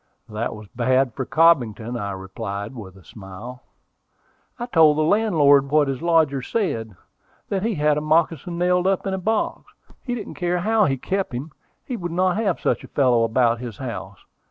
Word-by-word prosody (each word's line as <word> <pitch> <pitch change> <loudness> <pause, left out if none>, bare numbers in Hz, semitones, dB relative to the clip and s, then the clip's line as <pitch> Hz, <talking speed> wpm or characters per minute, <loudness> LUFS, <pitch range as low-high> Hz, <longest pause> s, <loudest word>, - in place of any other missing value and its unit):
"That 110 +1 -4
was 105 -1 -11
bad 130 0 +1
for 130 +1 -4
Cobbington," 125 -8 +2
I 105 -4 -3
replied, 100 +3 -6
with 100 -7 -10
a 95 - -17
smile. 105 +8 -10 1.0
"I 240 - -4
told 160 -9 +4
the 155 - +2
landlord 155 -8 +4
what 150 0 +3
his 135 -2 -3
lodger 160 -5 +2
said, 115 - -2 0.5
that 195 -2 -1
he 225 +1 -1
had 150 -1 +2
the - - -1
moccasin 165 +2 0
nailed 180 +1 +2
up 195 0 0
in 195 - -1
a 190 - -2
box. 220 +4 -2 0.3
He 245 -2 -3
didn't 215 -4 -7
care 175 0 -1
how 220 +2 +3
he 135 -2 0
kept 195 +3 -2
him: 140 +6 -6 0.3
he 250 - -4
would 175 -3 -5
not 185 +2 +1
have 205 -6 0
such - - 0
a - - -10
fellow 125 -4 +2
about 115 0 +2
his 120 -4 -7
house. 100 -7 -6
145 Hz, 185 wpm, -22 LUFS, 115-180 Hz, 1.0 s, told